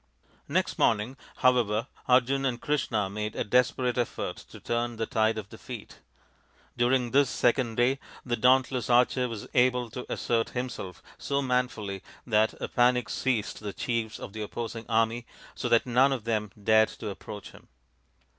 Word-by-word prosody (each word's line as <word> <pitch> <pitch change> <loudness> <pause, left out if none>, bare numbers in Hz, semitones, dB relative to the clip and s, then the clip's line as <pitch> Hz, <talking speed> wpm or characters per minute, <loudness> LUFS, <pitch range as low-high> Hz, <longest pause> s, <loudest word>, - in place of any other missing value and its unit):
Next - - 0
morning, 115 +4 +2 0.2
however, 120 -3 +2 0.2
Arjun 130 +2 +3
and 125 -3 0
Krishna 115 -9 0
made 105 +2 -4
a - - 0
desperate 125 +2 +2
effort 120 - -2
to - - -13
turn 120 0 -2
the 115 0 -2
tide 110 0 +1
of 105 -2 -6
defeat. 115 0 -9 0.8
During 120 0 +2
this 140 0 +4
second 120 -2 +1
day 125 +3 +2 0.3
the 120 -2 0
dauntless 125 0 +3
archer 125 +1 +3
was 110 -3 -6
able 125 -1 +2
to 125 +1 -7
assert 115 -1 0
himself 115 -8 -5 0.2
so 140 0 -1
manfully 125 -6 -1 0.2
that 110 -2 +2
a - - -3
panic 125 -1 +2
seized 120 -6 -1
the 105 -2 -5
chiefs 115 -3 -2
of 100 - -8
the 110 - -5
opposing 115 +1 -5
army, 115 +1 +1 0.3
so - - -3
that 115 - +4
none 130 +2 +4
of 130 -5 -2
them 110 -2 -1
dared 110 +1 +4
to 110 - -5
approach 105 +1 -9
him. - - -17
120 Hz, 160 wpm, -28 LUFS, 110-125 Hz, 0.8 s, this